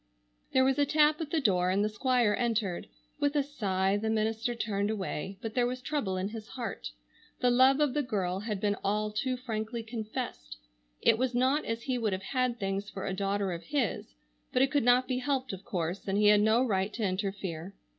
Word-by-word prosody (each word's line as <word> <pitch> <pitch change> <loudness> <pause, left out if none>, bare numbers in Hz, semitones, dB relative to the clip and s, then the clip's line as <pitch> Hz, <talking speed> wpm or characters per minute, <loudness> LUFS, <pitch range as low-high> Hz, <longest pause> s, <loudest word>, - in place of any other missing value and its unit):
There 260 - +4
was 270 +2 +2
a 285 - +5
tap 300 +1 +4
at 310 - -3
the 320 - +1
door 185 -8 +2
and 200 +3 +2
the - - +2
Squire 240 0 +2
entered. 220 -6 -1 0.3
With 290 0 +1
a 290 - +3
sigh 195 -8 0
the 220 +2 -2
minister 220 +2 0
turned 205 -3 -1
away, 195 -3 -3
but 225 -1 -4
there 245 0 +2
was 255 +1 -3
trouble 250 -9 -2
in 185 +2 -2
his 215 -1 -8
heart. 245 -3 -5 0.5
The 250 - +3
love 260 +3 +5
of 295 -4 +2
the 295 - +1
girl 195 -8 -1
had 210 -1 -3
been 205 0 +1
all 210 +1 0
too 255 +4 -1
frankly 230 -1 -4
confessed. 215 - -5 0.5
It 225 - +5
was 255 -1 0
not 260 +5 +2
as 230 0 -3
he 255 -2 -1
would 215 -4 0
have 190 0 -3
had 255 -2 +1
things 195 0 -2
for 190 - -6
a 195 - -2
daughter 195 0 -1
of 170 -1 -6
his, 255 - -2 0.4
but 255 - +3
it 270 - +1
could 290 - +3
not 245 +1 +4
be 255 -1 -1
helped 260 -3 -1
of 190 +1 -7
course, 175 +1 -3
and 195 +1 +1
he 210 0 +5
had 210 0 +6
no 220 +4 +4
right 195 -3 0
to 230 - -3
interfere. 190 -2 -3
220 Hz, 215 wpm, -30 LUFS, 195-255 Hz, 0.5 s, had